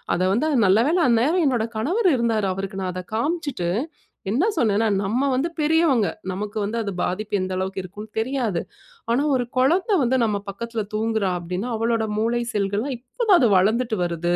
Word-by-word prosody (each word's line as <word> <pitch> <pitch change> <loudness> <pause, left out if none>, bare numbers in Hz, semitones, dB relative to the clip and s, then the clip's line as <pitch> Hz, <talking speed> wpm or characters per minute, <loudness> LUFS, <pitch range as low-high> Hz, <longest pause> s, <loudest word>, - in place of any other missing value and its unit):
அத 175 - -2
வந்து 260 +9 +1 0.2
நல்லவேளை 235 - +3
அந்நேரம் 275 +10 +3
என்னோட 240 -5 +1
கணவர் 365 - +2
இருந்தாரு, 225 -4 +1
அவருக்கு 195 0 -5
நான் 185 -1 -2
அதை 185 0 -6
காம்சிட்டு, 285 - -1 0.6
என்ன 270 - +2
சொன்னேன்னா, 225 -5 +2
"நம்ம 235 +8 0
வந்து 270 +6 0
பெரியவங்க, 300 -8 +3 0.2
நமக்கு 205 +3 -5
வந்து 210 +3 -2
அது 205 -2 -3
பாதிப்பு 205 +3 -1
எந்த 185 0 -3
அளவுக்கு 190 +1 -3
இருக்குனு 205 +4 -9
தெரியாது. 225 -6 -1 0.5
ஆனா, 250 +5 +2
ஒரு 250 - +1
குழந்தை 350 - +3
வந்து 255 0 +2
நம் 215 -2 +1
பக்கத்தில 230 +3 -4
தூங்குகிறாள் 215 -4 0
அப்படினா, 180 +6 -4
அவளோட 225 0 0
மூளை 230 +2 +1
செல்கள் 200 -1 0
எல்லாம் 270 +1 -3
இப்போ 250 - -5
தான் 380 - +8
அது 245 - +4
வளர்ந்துட்டு 220 +4 +1
வருது. 175 0 -1
225 Hz, 170 wpm, -23 LUFS, 200-260 Hz, 0.6 s, தான்